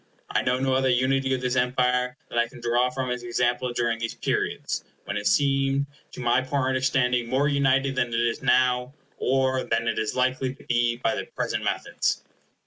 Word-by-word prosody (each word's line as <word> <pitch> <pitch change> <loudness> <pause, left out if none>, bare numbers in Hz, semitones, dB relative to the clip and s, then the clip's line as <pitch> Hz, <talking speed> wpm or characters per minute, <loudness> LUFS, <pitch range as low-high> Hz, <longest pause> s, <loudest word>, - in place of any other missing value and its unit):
I - - +2
know 125 - +1
no 135 0 +1
other 130 0 +2
unity 135 +2 +2
of 130 - -5
this 125 0 -1
Empire 125 0 +1
than 120 - -1
I 120 - +2
can - - -13
draw 120 +1 +2
from 130 0 -3
its 125 0 -3
example 120 +1 0
during 120 -1 0
these 115 0 -3
periods, - - -2 0.2
when - - -4
it 105 0 -1
seemed 140 -1 +2 0.3
to - - -9
my 120 +1 +2
poor 130 0 -1
understanding 130 -2 +1
more 135 +3 +2
united 135 -1 +2
than 120 - +1
it 115 - 0
is 120 -1 0
now, 125 +1 +2 0.2
or 130 0 +1
than 115 0 -1
it 115 - 0
is 110 - -2
likely 130 0 0
to - - -17
be 120 0 +1
by 115 -2 0
the - - -3
present - - -3
methods. - - -1
125 Hz, 200 wpm, -25 LUFS, 120-130 Hz, 0.3 s, I